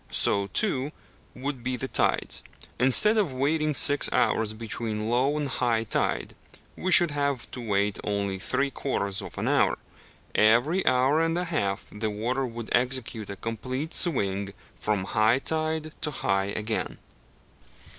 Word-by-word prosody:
So, 100 -1 +2
too, 140 - 0 0.4
would 130 -1 -5
the 125 0 -2
tides: - - +1 0.4
instead 135 - +4
of 200 -9 +1
waiting 150 +3 0
six 145 +2 +4
hours 110 -1 +1
between 110 -1 -3
low 130 +5 +1
and 150 -1 -2
high 120 -4 0
tide, 110 - -1 0.4
we 185 - -2
should 175 -3 +8
have 140 -3 -2
to 125 - -7
wait 100 -2 0
only 100 -2 -2
three 140 +7 0
quarters 100 -9 -2
of - - -10
an - - -2
hour. - - +2 0.6
Every 120 - +3
hour 130 +5 +3
and 165 +1 0
a 180 - 0
half 100 - -2
the 110 +1 -3
water 120 +6 -2
would 115 -1 -7
execute 125 -4 -1
a 100 - -5
complete 130 - -5
swing 100 - 0 0.2
from 105 -3 -1
high 110 +4 +2
tide 155 +2 -1
to 155 - -1
high 95 -8 0
again. 105 +2 -3
125 Hz, 145 wpm, -26 LUFS, 105-145 Hz, 0.6 s, should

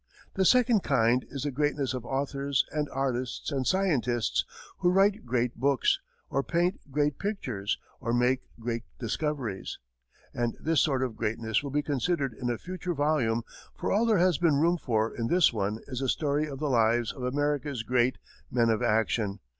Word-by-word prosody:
The 190 - +1
second 240 0 +5
kind 125 -3 +2
is 140 -1 -5
the 145 - -1
greatness 140 -1 0
of 125 -1 -5
authors 140 0 0
and 150 -1 -1
artists 130 0 -2
and 135 -2 -1
scientists, 135 - +1 0.4
who 175 - +3
write 195 -4 +3
great 120 0 0
books, 135 -1 +2 0.3
or 135 - +1
paint 175 +6 0
great 145 0 0
pictures 125 - -2 0.2
or 115 - -2
make 125 +2 +2 0.2
great 115 0 -2 0.2
discoveries, 120 -4 -3 0.6
and 120 -1 -1
this 160 -2 +2
sort 135 -3 +1
of 125 -4 -3
greatness 110 0 -1
will 140 - -5
be 145 +2 0
considered 145 -1 0
in 120 +2 -3
a 120 - -1
future 180 +2 -4
volume; 140 -6 +1 0.3
for - - -2
all 220 +4 +3
there 220 -3 +4
has 180 -4 +3
been 165 -4 +3
room 170 +4 +3
for 110 -4 0
in 115 -1 -2
this 175 -3 +4
one 105 0 -1
is 130 -3 -5
the 135 -1 -1
story 150 +2 +1
of 140 -2 -6
the 150 +2 -2
lives 115 -2 +2
of 130 - -10
America's 140 -1 -1
great 125 +2 +2 0.3
"men 115 -2 +3
of 110 - 0
action." 105 -2 +1
135 Hz, 180 wpm, -28 LUFS, 120-150 Hz, 0.6 s, second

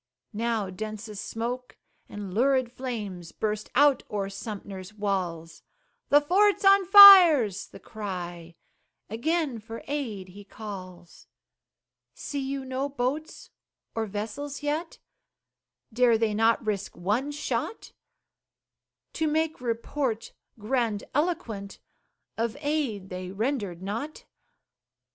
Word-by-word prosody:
Now 220 -3 -1
densest 215 +1 -6
smoke 245 +2 -5 0.3
and 205 -3 -7
lurid 255 +2 +2
flames 210 -10 -6
Burst 210 -1 -3
out 285 +1 +5
o'er 200 -2 -3
Sumter's 200 -1 -8
walls; 180 -5 -3 0.5
"The 290 - +7
fort's 390 +7 +2
on 390 -1 +6
fire," 380 - +10
's 195 - -7
the - - -13
cry; 175 -5 -7 0.6
Again 285 +1 -1
for 225 +1 -9
aid 230 -10 -4
he 200 +3 -12
calls. 185 -4 -10 0.9
See 285 - -5
you 270 0 -4
no 260 +2 -2
boats 280 +4 -4 0.4
or 225 -1 -2
vessels 250 +9 -5
yet? 310 +3 -2 1.0
Dare 240 -1 +4
they 220 -1 0
not 225 +2 +2
risk 205 -2 -3
one 210 +10 -1
shot, 295 +9 -4 1.2
To 320 - 0
make 315 -1 -1
report 235 0 -3 0.2
grandiloquent 230 - -2 0.6
Of 230 +3 -1
aid 285 -10 -2
they 185 0 -6
rendered 200 -4 -3
not? 230 +10 -5
225 Hz, 105 wpm, -27 LUFS, 200-285 Hz, 1.2 s, fire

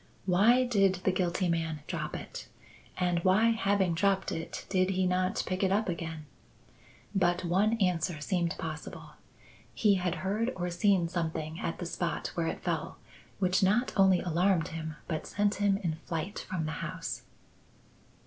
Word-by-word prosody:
Why 210 +8 +5
did 195 -6 +3
the 190 - +3
guilty 185 0 0
man 165 -2 -1
drop - - -4
it? - - -7 0.5
and 175 -2 +1
why, 210 +5 +4
having 200 -5 +1
dropped 190 +2 +1
it, 165 - -5
did 185 -1 +2
he 190 -1 +1
not 185 +1 +1
pick 185 0 -2
it 190 -1 +2
up 210 +3 +2
again? 165 -3 -4 0.9
but 175 -2 +2
one 195 +6 +2
answer 180 -6 0
seemed 170 +2 -1
possible. 155 -1 -6 0.6
He 210 -2 +4
had 180 -1 0
heard 225 +6 0
or 180 -1 -2
seen 175 0 +3
something 160 -2 -3
at 165 - -3
the 175 - -5
spot 170 0 -2
where 170 -1 -1
it - - -4
fell - - -2 0.4
which 185 -1 +2
not 210 +6 +2
only 190 -2 +5
alarmed 175 0 +2
him 160 -1 -5
but 155 -1 -3
sent 205 0 +1
him 200 -1 +3
in 175 -6 -2
flight 165 +3 -5
from 170 -4 -2
the 155 - -2
house." - - -4
185 Hz, 160 wpm, -30 LUFS, 170-195 Hz, 0.9 s, Why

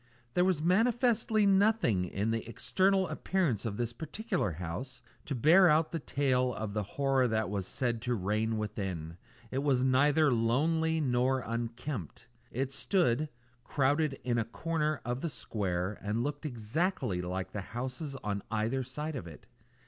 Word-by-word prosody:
There 180 - +3
was 180 -5 +1
manifestly 220 +2 +3
nothing 195 - +3
in 100 +5 -1
the 115 -1 -1
external 190 +8 +2
appearance 150 - 0
of 105 -2 -4
this 120 -1 -2
particular 155 - -2
house 90 - -6 0.2
to 140 - -3
bear 170 +9 +6
out 155 +1 +3
the 165 - -2
tales 130 -3 +1
of 105 -1 -4
the 105 - 0
horror 135 +5 +1
that 110 -3 0
was 100 -2 -2
said 120 -3 -1
to 125 -1 0
reign 110 +3 0
within. 95 -6 -4 0.3
It 130 - -1
was 135 -3 +2
neither 145 +3 +4
lonely 160 +8 +2
nor 130 -1 +2
unkempt. 115 - -4 0.2
It 135 +2 -2
stood, 155 - +1 0.3
crowded 145 +3 +1
into 120 -2 +1
a - - -3
corner 155 +2 -1
of 120 +2 -2
the 170 - -1
square, 95 -6 -3
and 105 +3 -1
looked 145 +2 -3
exactly 120 - -1
like 90 +1 -4
the 105 - -4
houses 130 - -5
on 100 -1 -2
either 115 +4 0
side 150 +5 -5
of 90 -10 -5
it. 80 - -12
125 Hz, 155 wpm, -31 LUFS, 110-155 Hz, 0.3 s, bear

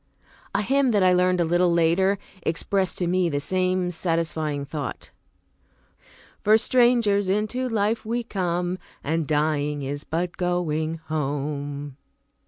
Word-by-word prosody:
A 205 - +2
hymn 270 +3 +2
that 205 -2 +3
I 185 -1 +5
learned 180 0 +3
a - - +4
little 175 +1 +3
later 170 +4 +3 0.2
expressed 185 +4 0
to 180 - -1
me 180 0 +1
the 145 -2 -1
same 185 +2 0
satisfying 160 -4 -1
thought: 145 0 -6 1.3
"For 215 +1 +6
strangers 230 -5 +3
into 215 +6 0
life 220 0 0
we 235 +2 -2
come, 180 -4 -2 0.2
And 160 +1 -1
dying 150 -1 0
is 145 +2 -4
but 175 +2 -3
going 165 -3 -1
home." 145 -2 -3
175 Hz, 130 wpm, -24 LUFS, 155-200 Hz, 1.3 s, For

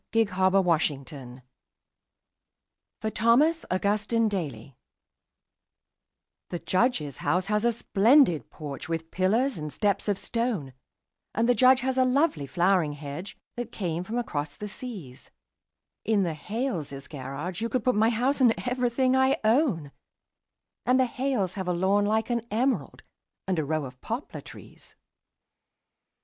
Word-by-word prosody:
The 225 0 +4
Snowman 185 -4 +2
in 140 -2 -8
the 135 -5 -9
Yard 125 +1 -13 1.6
(For 220 - -1
Thomas 285 +11 +3
Augustine 210 +4 +1
Daly) 140 - -4 1.7
The 175 - -3
Judge's 185 - 0
house 180 +1 0
has 210 +1 0
a 235 - +4
splendid 220 - +3
porch, 145 0 -7
with 165 0 -3
pillars 220 +6 +1
and 150 0 -5
steps 205 +3 0
of 205 -2 +1
stone, 220 - -2 0.6
And 230 +2 +2
the 245 - +5
Judge 255 +2 +5
has 260 0 0
a - - +6
lovely 255 - +1
flowering 175 +1 +2
hedge 145 +6 -7 0.2
that 240 -1 -5
came 175 -5 -3
from 220 +6 -4
across 150 -11 -3
the 210 - -6
seas; 190 - -8 0.7
In 210 -2 +2
the 170 -3 -1
Hales' 160 - -4
garage 145 +7 -6
you 230 - -1
could 250 -2 -1
put 255 - +3
my 220 +2 +3
house 250 +5 0
and 240 -3 +5
everything 250 +1 +1
I 265 +1 +3
own, 215 - +2 0.9
And 255 +1 +3
the 260 - +4
Hales 250 -7 -1
have 190 -2 -5
a 180 - +1
lawn 195 +4 +2
like 220 +3 0
an 235 -1 -1
emerald 225 - -1 0.4
and 185 -3 0
a - - 0
row 155 0 -1
of 125 -1 -11
poplar 235 +6 -5
trees. - - -14
205 Hz, 145 wpm, -27 LUFS, 160-240 Hz, 1.7 s, a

